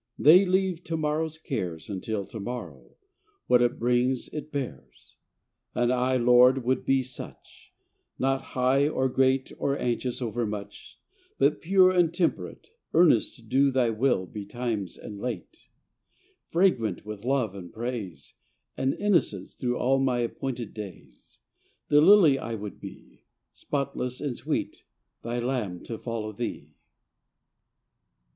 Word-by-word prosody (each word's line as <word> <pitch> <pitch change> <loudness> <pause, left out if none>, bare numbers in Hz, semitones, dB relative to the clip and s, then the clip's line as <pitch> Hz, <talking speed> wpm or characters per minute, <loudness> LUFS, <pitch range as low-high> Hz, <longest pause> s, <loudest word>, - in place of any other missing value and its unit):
They 180 +6 +7
leave 185 -2 +1
to 165 - -2
morrow's 155 +1 -1
cares 95 - -4
Until 100 +1 -3
the 110 - -9
morrow, 120 +5 -7 0.5
what 125 -1 +4
it 120 0 +1
brings 125 +1 +1
it 150 0 -7
bears. 140 -4 -7 0.6
And 120 +1 +2
I, 125 +1 +1
Lord, 125 +2 +5
would 130 +1 0
be 135 -1 +3
such; 130 0 -11 0.5
Not 135 +1 +1 0.2
high, 130 +3 +3
or 130 -3 0
great, 130 +1 +1
or 140 0 0
anxious 125 0 -2
overmuch, 105 -4 -5 0.4
But - - +2
pure 185 +1 +5
and 175 -3 +3
temperate, 170 - -2 0.2
Earnest 160 -9 +4
to - - -14
do 135 +5 +3
Thy 125 -3 +2
Will 110 -4 +1
betimes 105 0 -4
and 105 -1 -9
late, 125 - -6 0.8
Fragrant 125 - +1
with 105 -1 -7
love 125 -5 0
and 90 -4 -9
praise 115 -6 -6 0.4
And 135 +1 0
innocence 175 - 0
through 125 -1 -2
all 135 +2 +2
my 130 -2 +1
appointed 120 -1 -4
days 90 - -11 0.5
Thy 145 - +5
lily 160 -4 +7
I 115 - -4
would 105 -1 -7
be - - -12 0.3
Spotless 135 -3 -3
and 140 -4 -3
sweet, - - -3 0.4
Thy 120 +1 -3
lamb 120 -8 -2
to 115 - -6
follow 115 -2 -4
Thee. 115 +3 -5
125 Hz, 135 wpm, -27 LUFS, 115-140 Hz, 0.8 s, They